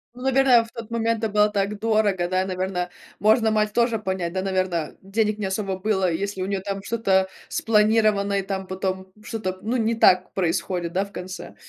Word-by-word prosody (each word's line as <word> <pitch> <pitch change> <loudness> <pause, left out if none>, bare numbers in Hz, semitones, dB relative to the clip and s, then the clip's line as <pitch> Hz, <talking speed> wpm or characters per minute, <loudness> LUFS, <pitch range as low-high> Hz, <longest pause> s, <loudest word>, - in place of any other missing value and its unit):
Ну, 250 - -9
наверное, 265 -2 +5
в 230 - -14
тот 230 -2 -8
момент 230 -1 -1
это 220 - 0
было 210 0 +4
так 205 0 -1
дорого, 210 -5 +1
да? 185 +1 +1
Наверно, 185 -1 -2 0.3
можно 220 +2 +4
мать 215 -1 +1
тоже 235 -1 +2
понять, 190 -4 -3
да? 190 - -1
Наверно, 185 -4 -1
денег 210 +2 0
не 210 - -3
особо 190 0 -2
было, 190 -2 +1
если 195 +3 -3
у 185 - -2
нее, 195 -1 -2
там, 195 0 -4
что-то 195 -4 +1 0.2
спланировано, 215 -2 +2
и, - - 0
там, 195 0 -4
потом 190 0 -4
что-то, 190 -5 -4
ну, 225 +5 -1
не 225 -1 +1
так 185 -4 +4
происходит, 175 -1 -1
да, 190 +2 +1
в 200 - -15
конце? 185 0 -8
200 Hz, 195 wpm, -24 LUFS, 185-220 Hz, 0.3 s, наверное